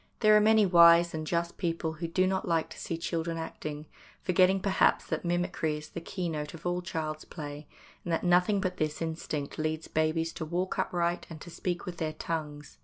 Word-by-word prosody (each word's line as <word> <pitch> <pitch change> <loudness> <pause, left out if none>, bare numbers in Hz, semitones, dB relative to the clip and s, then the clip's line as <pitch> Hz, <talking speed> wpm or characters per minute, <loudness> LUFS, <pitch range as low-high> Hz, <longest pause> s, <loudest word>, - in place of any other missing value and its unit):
There 215 -1 +6
are - - +8
many 215 0 +5
wise 170 -1 +7
and 155 -1 -4
just 170 +1 -1
people 165 -2 -1
who 165 +2 -4
do 185 +3 +2
not 190 0 -1
like 165 -2 0
to - - -9
see 165 - -3
children 165 0 -2
acting, 155 -2 -6 0.4
forgetting 185 +1 +4
perhaps 190 0 +2
that - - -3
mimicry 175 -3 -1
is 150 +1 -10
the 170 - -6
keynote 165 -4 -4
of 165 - -13
all 175 0 0
child's 155 -4 -4
play, 145 -2 -8 0.4
and 175 - -4
that 165 - 0
nothing 180 +3 +4
but 185 -1 -2
this 155 -1 -1
instinct 160 -3 -4
leads 155 0 -2
babies 160 +1 0
to - - -5
walk 175 +4 -2
upright 175 0 0
and 160 -2 -8
to 175 - -9
speak 175 +1 -3
with 180 -2 -6
their 155 -1 -2
tongues. 150 -2 -5
170 Hz, 200 wpm, -29 LUFS, 155-180 Hz, 0.4 s, are